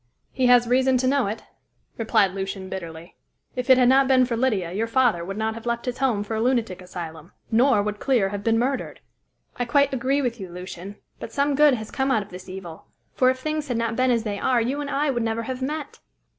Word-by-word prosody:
"He 255 Hz, -1 st, +1 dB
has 245 Hz, -1 st, +6 dB
reason 260 Hz, +1 st, +3 dB
to 255 Hz, -, -1 dB
know 275 Hz, -4 st, +2 dB
it," 215 Hz, +3 st, -5 dB, 0.5 s
replied 220 Hz, -4 st, +2 dB
Lucian 190 Hz, -1 st, -5 dB
bitterly. 170 Hz, -3 st, -8 dB, 0.4 s
"If 250 Hz, +1 st, -4 dB
it 260 Hz, -, +8 dB
had 250 Hz, -1 st, +5 dB
not 265 Hz, +1 st, +5 dB
been 255 Hz, -1 st, +5 dB
for 240 Hz, -1 st, -2 dB
Lydia, 215 Hz, -8 st, 0 dB
your 215 Hz, +5 st, -1 dB
father 230 Hz, -7 st, +2 dB
would 195 Hz, +3 st, -6 dB
not 220 Hz, 0 st, -1 dB
have 230 Hz, +1 st, -9 dB
left 235 Hz, 0 st, -2 dB
his 250 Hz, 0 st, -4 dB
home 245 Hz, -6 st, +1 dB
for 210 Hz, -, -6 dB
a 220 Hz, -, -1 dB
lunatic 230 Hz, -7 st, 0 dB
asylum, 170 Hz, -3 st, -8 dB, 0.2 s
nor 235 Hz, -1 st, +4 dB
would 210 Hz, 0 st, -3 dB
Clear 240 Hz, -8 st, +2 dB
have 200 Hz, 0 st, -5 dB
been 225 Hz, +1 st, +2 dB
murdered." 255 Hz, +3 st, -2 dB, 0.6 s
"I 245 Hz, -, -1 dB
quite 280 Hz, +3 st, +2 dB
agree 265 Hz, +3 st, 0 dB
with 240 Hz, -2 st, -2 dB
you, 190 Hz, -2 st, -7 dB
Lucian; 180 Hz, +2 st, -8 dB, 0.2 s
but -, -, -7 dB
some 280 Hz, +3 st, +1 dB
good 290 Hz, -1 st, +5 dB
has 220 Hz, -2 st, -7 dB
come 265 Hz, 0 st, -1 dB
out 220 Hz, -6 st, +2 dB
of 200 Hz, -, -17 dB
this 180 Hz, +1 st, -10 dB
evil, 180 Hz, -4 st, -9 dB, 0.3 s
for 255 Hz, -, +3 dB
if 260 Hz, -, 0 dB
things 305 Hz, +2 st, -3 dB
had 245 Hz, -3 st, -1 dB
not 230 Hz, 0 st, -1 dB
been 255 Hz, +1 st, +2 dB
as 235 Hz, -2 st, +2 dB
they 205 Hz, -3 st, -3 dB
are, 255 Hz, -2 st, +2 dB
you 260 Hz, +6 st, -1 dB
and 285 Hz, -, -4 dB
I 285 Hz, +1 st, +1 dB
would 240 Hz, -2 st, -1 dB
never 225 Hz, 0 st, -1 dB
have 255 Hz, +2 st, -5 dB
met." 290 Hz, +2 st, -4 dB
235 Hz, 240 wpm, -24 LUFS, 200-260 Hz, 0.6 s, it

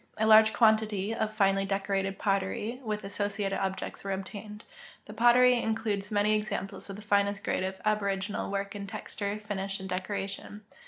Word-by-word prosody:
A 220 Hz, -, +1 dB
large 220 Hz, 0 st, +7 dB
quantity 220 Hz, -2 st, +2 dB
of 220 Hz, -1 st, -1 dB
finely 195 Hz, -2 st, +2 dB
decorated 195 Hz, 0 st, -1 dB
pottery 205 Hz, +5 st, -1 dB
AA'ith 215 Hz, -2 st, -3 dB
a.ssociated 200 Hz, 0 st, -2 dB
objects 190 Hz, 0 st, -3 dB
aa^is 195 Hz, -1 st, -2 dB
obtained. 210 Hz, +2 st, -8 dB, 0.4 s
The 210 Hz, -, -9 dB
pt)ttery 240 Hz, +2 st, +5 dB
includes 220 Hz, -2 st, -1 dB
many 210 Hz, 0 st, +2 dB
examples 210 Hz, -2 st, -3 dB
of 195 Hz, -, -5 dB
the 210 Hz, -, -10 dB
finest 200 Hz, -1 st, +1 dB
grade -, -, 0 dB
of 190 Hz, 0 st, -4 dB
aboriginal 200 Hz, -1 st, 0 dB
work 200 Hz, 0 st, -2 dB
in 200 Hz, -1 st, -5 dB
texture, 205 Hz, -1 st, -4 dB
finisli, 200 Hz, -2 st, -4 dB
and 190 Hz, -, -6 dB
decoration. 195 Hz, +2 st, -4 dB
205 Hz, 160 wpm, -29 LUFS, 195-215 Hz, 0.4 s, large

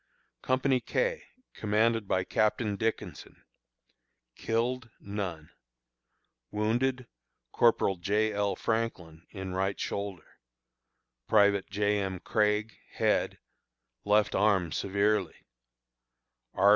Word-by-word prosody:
Company 130 Hz, 0 st, +2 dB
K, -, -, -1 dB, 0.3 s
commanded 110 Hz, 0 st, +1 dB
by 95 Hz, -1 st, +1 dB
Captain 105 Hz, +2 st, +1 dB
Dickinson. 110 Hz, +3 st, -4 dB, 0.9 s
Killed: 120 Hz, +2 st, -1 dB
None. 95 Hz, -6 st, -5 dB, 1.0 s
Wounded: 120 Hz, +5 st, 0 dB, 0.5 s
Corporal 110 Hz, -5 st, +3 dB
J. 105 Hz, +4 st, +1 dB
L. 100 Hz, -1 st, 0 dB
Franklin, 90 Hz, -8 st, -3 dB
in 95 Hz, -2 st, -6 dB
right 95 Hz, +1 st, -1 dB
shoulder; 100 Hz, -4 st, -5 dB, 0.9 s
Private 100 Hz, -2 st, +4 dB
J. 105 Hz, +1 st, +1 dB
M. 95 Hz, -2 st, -3 dB
Craig, 105 Hz, +2 st, 0 dB
head, -, -, +1 dB, 0.7 s
left 105 Hz, +1 st, +3 dB
arm 95 Hz, -4 st, +2 dB
severely; 100 Hz, +1 st, 0 dB, 1.2 s
R. 100 Hz, +2 st, +5 dB
105 Hz, 90 wpm, -29 LUFS, 95-115 Hz, 1.2 s, R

